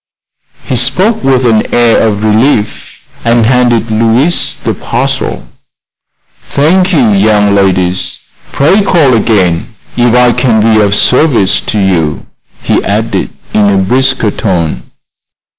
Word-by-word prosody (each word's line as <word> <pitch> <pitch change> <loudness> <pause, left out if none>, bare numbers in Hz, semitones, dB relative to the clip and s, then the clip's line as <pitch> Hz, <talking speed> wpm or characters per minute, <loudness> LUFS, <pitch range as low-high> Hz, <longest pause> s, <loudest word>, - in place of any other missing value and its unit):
He 130 - -3
spoke 180 - +1
with 130 -1 +1
an 110 -2 0
air 120 -1 +2
of 105 -2 -1
relief, 110 0 -1 0.3
and 115 -1 +1
handed 120 -2 +1
Louise 115 +9 0
the - - -1
parcel. - - -4 1.0
"Thank 180 +6 +1
you, 135 - +2
young 105 0 +2
ladies. 95 -2 -1 0.3
Pray 165 +9 +2
call 165 -9 +2
again 105 -3 0 0.2
if 120 -1 +1
I 125 0 +4
can 115 -2 +1
be 110 0 +2
of 100 0 0
service 125 -5 +1
to 110 - -2
you," 85 -7 -1 0.4
he - - 0
added, 110 +3 -2 0.2
in 105 -1 +2
a 100 - +1
brisker 125 +3 0
tone. 90 -8 -3
115 Hz, 125 wpm, -9 LUFS, 100-130 Hz, 1.0 s, I